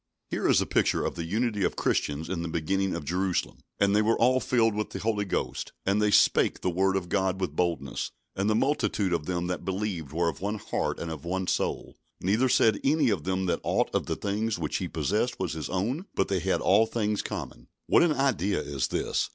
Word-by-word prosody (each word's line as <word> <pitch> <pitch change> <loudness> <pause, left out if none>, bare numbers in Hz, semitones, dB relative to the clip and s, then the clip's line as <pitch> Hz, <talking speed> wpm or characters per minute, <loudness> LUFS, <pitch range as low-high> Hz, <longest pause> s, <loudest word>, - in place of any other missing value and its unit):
Here - - 0
is - - +5
a - - 0
picture - - +1
of - - -1
the 85 - -5
unity 105 +3 0
of - - 0
Christians 75 +2 -1
in 85 -1 -3
the 85 - -3
beginning 95 +4 -1
in 75 - -5
Jerusalem: 90 +2 -1 0.2
"And 100 0 +3
they 105 - +5
were 110 +2 +2
all 130 +2 +4
filled 115 -2 +2
with 105 +1 -2
the - - -6
Holy 105 -1 -1
Ghost, 95 - -3
and 100 +2 +2
they 105 - +3
spake - - +4
the 90 - 0
word 95 +2 +2
of 95 -2 -1
God 95 +1 0
with 90 -6 -2
boldness. 85 -7 -1 0.3
And 100 +2 0
the 110 - +3
multitude 110 -7 +1
of 80 -3 -2
them 90 -1 -1
that 90 0 -3
believed 95 -5 -3
were 85 +2 0
of 85 - -3
one 105 +2 -2
heart - - -2
and 85 - -5
of 80 -2 -7
one 95 +2 -2
soul; - - -2 0.2
neither 110 +8 +2
said 110 -2 +4
any 140 -3 +3
of 85 -7 -2
them 95 0 0
that 90 - 0
aught - - 0
of - - 0
the - - -1
things 105 +1 -1
which 80 -3 -2
he - - -3
possessed 110 +5 -1
was - - -2
his 80 -2 -5
own; 120 - -2
but 95 - +1
they 95 -1 +1
had 95 +2 0
all 110 +3 +4
things 105 -3 -1
common." - - -6 0.2
What - - +5
an 170 -3 +4
ideal 115 - +1
is 70 -2 -2
this! - - -1
95 Hz, 230 wpm, -27 LUFS, 85-110 Hz, 0.3 s, is